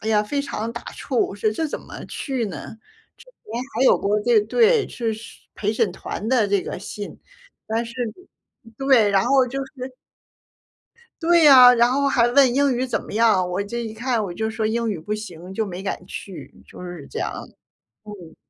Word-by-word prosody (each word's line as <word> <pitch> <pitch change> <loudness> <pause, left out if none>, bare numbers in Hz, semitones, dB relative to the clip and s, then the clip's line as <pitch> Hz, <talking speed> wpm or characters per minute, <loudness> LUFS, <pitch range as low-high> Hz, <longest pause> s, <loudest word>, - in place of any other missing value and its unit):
哎 220 - -4
呀， 210 -1 +3
非 280 +7 -2
常 230 -4 -4
打 235 - -7
怵， 265 - -5
我 215 - +1
说 215 +2 0
这 315 +9 -2
怎 295 - -5
么 - - -10
去 265 -5 -3
呢？ 200 +2 -8 0.4
之 470 - -17
前 245 - -7
还 265 - +2
有 - - +5
过， 205 +1 0
这 240 -1 +4
对， 450 - +3
是 230 -2 -2 0.4
陪 210 +1 -1
审 215 -2 +1
团 210 - -6
的 245 -4 +3
这 200 -2 +1
个 - - -6
信， 205 +2 -8 0.5
但 225 +2 -1
是 230 +1 -10 0.8
对， 265 -6 +4
然 195 -1 +3
后 270 -2 +4
就 260 +2 -5
是 270 - -19 1.5
对 340 0 +4
呀， 255 -4 +9
然 235 +1 +4
后 280 +1 +2
还 240 -3 +3
问 255 0 +4
英 280 -1 +3
语 255 +2 -1
怎 - - -2
么 - - -11
样？ 215 -5 +3
我 185 +3 -1
这 235 +4 -5
一 220 -1 -6
看 235 0 -1
我 175 - -6
就 220 +3 -2
说 220 0 -2
英 230 +1 -1
语 195 - -3
不 210 +6 -3
行 185 -4 -8
就 220 - 0
没 185 -1 -6
敢 195 -2 -4
去， 190 0 -9
就 - - -12
是 175 -5 -8
这 - - -6
样。 - - -2 0.7
嗯。 185 -6 -11
225 Hz, 215 characters per minute, -22 LUFS, 205-260 Hz, 1.5 s, 呀